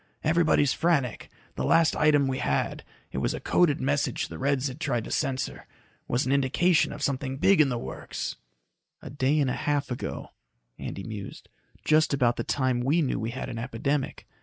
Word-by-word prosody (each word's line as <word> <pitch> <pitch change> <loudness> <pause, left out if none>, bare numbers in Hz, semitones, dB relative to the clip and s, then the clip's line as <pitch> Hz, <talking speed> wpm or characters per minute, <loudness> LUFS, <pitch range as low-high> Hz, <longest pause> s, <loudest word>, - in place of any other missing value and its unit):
Everybody's 155 -3 +3
frantic. 145 -8 0 0.2
The 65 - -3
last 165 - +4
item 145 -2 +4
we 130 0 -2
had 70 0 -1 0.3
it - - -3
was - - 0
a - - -5
coded 165 -5 +2
message 140 +1 0
the - - -8
Reds'd 135 0 0
tried 125 -9 -1
to - - -8
censor 130 0 -2 0.4
was 125 - 0
an 130 - 0
indication 140 +5 +3
of 150 - -6
something 135 -1 -1
big 190 +3 +5
in 145 - +3
the 125 - -1
works." - - -5 0.7
"A - - -8
day 140 +2 +1
and 135 -3 +2
half 145 0 -1
ago," 125 - -5 0.5
Andy 95 - -5
mused. 105 -2 -8 0.4
"Just 155 -2 +4
about 120 -3 +2
the 115 - -1
time 130 -2 0
we 145 +7 +2
knew 130 - -1
we 110 +3 -2
had 125 +2 -5
an 115 - -5
epidemic. 130 +4 -2
135 Hz, 180 wpm, -27 LUFS, 125-150 Hz, 0.7 s, big